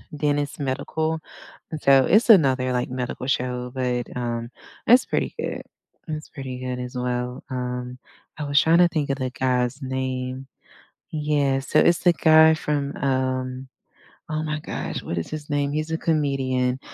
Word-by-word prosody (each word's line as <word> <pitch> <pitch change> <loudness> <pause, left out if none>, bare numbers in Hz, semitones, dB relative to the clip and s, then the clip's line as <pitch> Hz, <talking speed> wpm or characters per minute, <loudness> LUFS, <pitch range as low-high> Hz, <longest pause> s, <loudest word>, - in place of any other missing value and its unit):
Dennis 145 -1 -1
Medical, 155 +4 -2 0.5
and 155 - -4
so 135 -1 +6
it's 220 +4 +4
another, 130 - +5
like, 125 0 -1
medical 125 0 -4
show, 125 -2 -1
but, 125 -2 -1
um, 120 -1 -3 0.4
it's 245 +3 +6
pretty - - -1
good. - - -3 0.5
It's 155 -1 -5
pretty 130 -3 -7
good, 125 0 -4
as 125 +1 -6
well. 125 +1 -3
Um, 125 -1 -4 0.4
I 150 - -4
was 145 0 +3
trying 165 +1 +4
to 175 - +7
think 150 -4 -2
of 135 - -1
the 130 -1 -1
guy's 125 0 0
name. 130 0 -3 0.6
Yeah, 150 -3 +1
so 145 +3 0
it's 170 +2 +4
the 175 - +6
guy 160 -1 +6
from, 145 -2 -2
um, 130 -1 -1 0.6
oh, 155 0 -1
my 150 -1 -2
gosh, - - -5
what 85 - -4
is 85 - -3
his 155 -1 -7
name? 145 -1 0
He's 155 +1 -2
a 160 - 0
comedian, 135 -5 0
135 Hz, 165 wpm, -24 LUFS, 125-150 Hz, 0.6 s, to